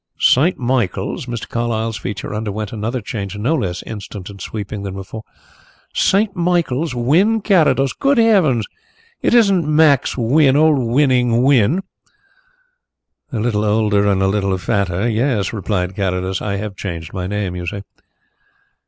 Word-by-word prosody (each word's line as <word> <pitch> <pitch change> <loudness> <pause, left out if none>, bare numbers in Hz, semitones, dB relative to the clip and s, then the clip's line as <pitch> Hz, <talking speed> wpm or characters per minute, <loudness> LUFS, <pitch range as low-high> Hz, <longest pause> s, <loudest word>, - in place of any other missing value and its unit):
"St. 155 +8 +3
Michael's!" 120 -3 -2
Mr. 120 -2 -5
Carlyle's 115 -1 -2
features 100 +2 -5
underwent 105 0 -4
another 115 +3 -3
change, 100 -2 -5
no 120 +10 0
less 90 - -2
instant 105 -2 -8
and 100 -2 -12
sweeping 105 0 -5
than 100 -1 -5
before. 95 +3 -7 0.7
"St. 200 +1 +2
Michael's! 170 -5 0
Wynn 170 - +2
Carrados? 150 - +2
Good 275 -1 +1
heavens! 185 - +3 0.6
it - - +2
isn't 200 -7 +4
Max 150 -4 +3
Wynn 135 +3 +3
old 155 -2 +4
'Winning' 125 -2 +2
Wynn"? 140 - +3 1.5
"A 120 - -3
little 105 -2 0
older 105 -1 +2
and 95 -1 +1
a - - +3
little 95 -1 0
fatter 95 +2 -1
yes," 115 -3 0
replied 95 -3 -2
Carrados. 95 -1 -2
"I 100 -1 -2
have 100 0 -5
changed 85 -5 -6
my 90 -2 -3
name 100 -2 -3
you 90 -1 -5
see." 100 +3 -4
110 Hz, 145 wpm, -18 LUFS, 100-140 Hz, 1.5 s, isn't